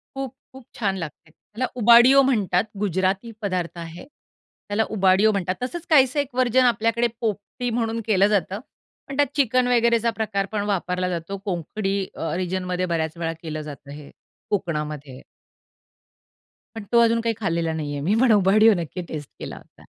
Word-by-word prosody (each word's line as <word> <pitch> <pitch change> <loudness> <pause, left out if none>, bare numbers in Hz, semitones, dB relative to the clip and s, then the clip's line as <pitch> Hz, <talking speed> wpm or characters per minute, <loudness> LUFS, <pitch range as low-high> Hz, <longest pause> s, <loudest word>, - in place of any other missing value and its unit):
खूप-खूप 265 -1 -8
छान 195 -4 0
लागते. 160 -2 -8
त्याला 220 +9 -5 0.2
उबाडियो 240 +4 +7
म्हणतात, 210 -9 +2 0.2
गुजराती 190 +3 0
पदार्थ 185 -4 -2
आहे. 170 +1 -8
त्याला 220 -6 -6
उबाडियो 195 +2 +4
म्हणतात. 190 -2 -1
तसंच 335 +7 -5
काहीसं 275 -2 +4
एक 285 -2 -1
व्हर्जन 255 0 +3
आपल्याकडे 235 0 +2
पोपटी 225 +3 -3
म्हणून 230 -1 -1
केलं 200 -2 +4
जातं. 200 -1 0 0.5
पण 275 - -6
त्यात 290 -1 +4
चिकन 255 -3 +2
वगैरेचा 235 -1 +3
प्रकार 200 -3 -1
पण 210 -2 -1
वापरला 180 -2 -1
जातो. 175 +3 -4
कोंकणी 195 +2 -2 0.4
रिजनमध्ये 185 0 -2
बऱ्याच 165 -2 -2
वेळा 165 -1 -2
केलं 155 -1 -4
जातं 145 -2 -10
हे 145 0 -10 0.4
कोकणामध्ये. 150 -8 -3 1.5
पण 225 - -6
तो 235 - +5
अजून 230 0 +3
काही 230 0 0
खाल्लेला 165 -5 -1
नाही 155 -2 -4
आहे. 145 - -4
मी 195 +7 +2
पण 260 -3 +5
उबाडियो 215 +2 +5
नक्की 170 +2 -5
टेस्ट 150 -3 -7
केला - - -6
होता. - - -18
200 Hz, 155 wpm, -23 LUFS, 175-235 Hz, 1.5 s, उबाडियो